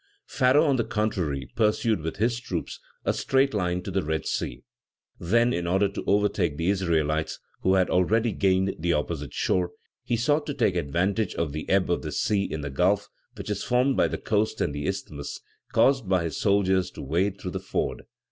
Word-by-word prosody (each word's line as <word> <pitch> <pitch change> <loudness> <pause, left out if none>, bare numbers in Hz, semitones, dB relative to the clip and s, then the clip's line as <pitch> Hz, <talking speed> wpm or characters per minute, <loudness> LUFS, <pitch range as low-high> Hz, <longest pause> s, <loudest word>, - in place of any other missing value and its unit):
Pharaoh, 135 +4 +3
on 140 -3 +2
the 115 - +1
contrary, 85 - -1
pursued, 110 -2 +2
with 80 +1 -4
his 115 +3 +1
troops, 90 -9 -5 0.3
a - - +2
straight 135 0 +2
line 90 -3 -1
to 100 - -5
the 95 +1 +1
Red 80 -1 -2
Sea; - - -3 0.6
then, 115 +7 +2
in 85 0 -2
order 95 +3 +3
to - - -6
overtake 100 -6 +1
the 85 +5 +1
Israelites, 80 -5 0 0.2
who 95 +1 +3
had 95 -1 +3
already 110 +6 +2
gained 95 -1 +2
the 85 +1 +1
opposite 75 -2 -2
shore, 90 -1 0 0.3
he 120 - 0
sought 145 +6 +1
to 145 - -3
take 110 -8 +2
advantage 90 +6 0
of 85 -3 -1
the 75 +2 -6
ebb 95 -2 +2
of 85 - +1
the - - -5
sea 100 -2 +1
in 80 - -3
the 70 -1 -5
Gulf, 90 +8 +1 0.3
which - - -5
is 100 -1 -2
formed 125 +2 +2
by - - +3
the - - -3
coast 110 0 0
and 75 - 0
the 75 0 -3
Isthmus, 70 -1 -4 0.3
and - - -29
caused 130 -8 +3
his 85 -4 +1
soldiers 95 -2 +2
to - - -8
wade 95 +8 0
through 90 - -5
the - - -3
ford. - - -3
95 Hz, 200 wpm, -26 LUFS, 85-110 Hz, 0.6 s, Pharaoh